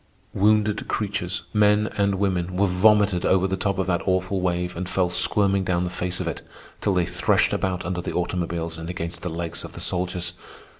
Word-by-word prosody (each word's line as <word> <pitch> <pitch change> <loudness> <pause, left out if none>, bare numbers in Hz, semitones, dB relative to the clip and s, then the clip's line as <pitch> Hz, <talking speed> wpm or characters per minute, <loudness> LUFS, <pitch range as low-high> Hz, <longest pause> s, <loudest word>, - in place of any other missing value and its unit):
Wounded 105 +1 +2
creatures, 100 -4 -2
men 105 0 +4
and 100 -1 +1
women, 95 -2 -1
were 100 - +4
vomited 100 0 +3
over 95 0 +3
the 95 0 0
top 100 +1 -1
of 95 - 0
that 85 -2 0
awful 95 +1 0
wave 90 0 -1
and 90 +1 -4
fell 90 -2 +1
squirming 100 -1 +2
down 90 -1 0
the 90 - -3
face 90 0 -2
of - - -3
it - - -4 0.4
till 100 - +1
they 90 -1 +2
threshed - - +2
about 90 -2 -1
under 90 0 -2
the - - -4
automobiles 85 -2 -2
and 80 +1 -6
against 85 -1 -5
the 90 - -3
legs 85 0 -4
of - - -9
the - - -8
soldiers. 90 -1 0
90 Hz, 200 wpm, -24 LUFS, 90-100 Hz, 0.4 s, men